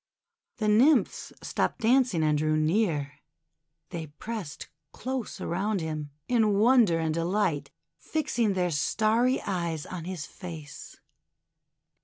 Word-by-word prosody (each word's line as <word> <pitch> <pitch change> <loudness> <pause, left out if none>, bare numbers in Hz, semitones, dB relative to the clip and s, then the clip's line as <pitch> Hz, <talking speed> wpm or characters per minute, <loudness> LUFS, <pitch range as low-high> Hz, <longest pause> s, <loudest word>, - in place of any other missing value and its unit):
The 215 - -1
Nymphs 245 +9 +3
stopped - - -1
dancing 235 -7 +3
and 155 -1 +3
drew 155 +1 +1
near. 155 -4 0 0.7
They 165 -2 -5
pressed 165 +1 -6 0.3
close 260 -3 -4
around 195 +4 -1
him, 155 -2 -4 0.2
in 220 -5 +3
wonder 225 -5 +5
and 160 -1 0
de 165 +1 -1
light, 175 -5 0 0.3
fixing 240 -9 0
their 180 -2 0
starry 220 - +2
eyes 170 -5 -2
on 175 -3 -6
his 180 -4 -5
face. 160 -5 -9
180 Hz, 120 wpm, -28 LUFS, 155-220 Hz, 0.7 s, wonder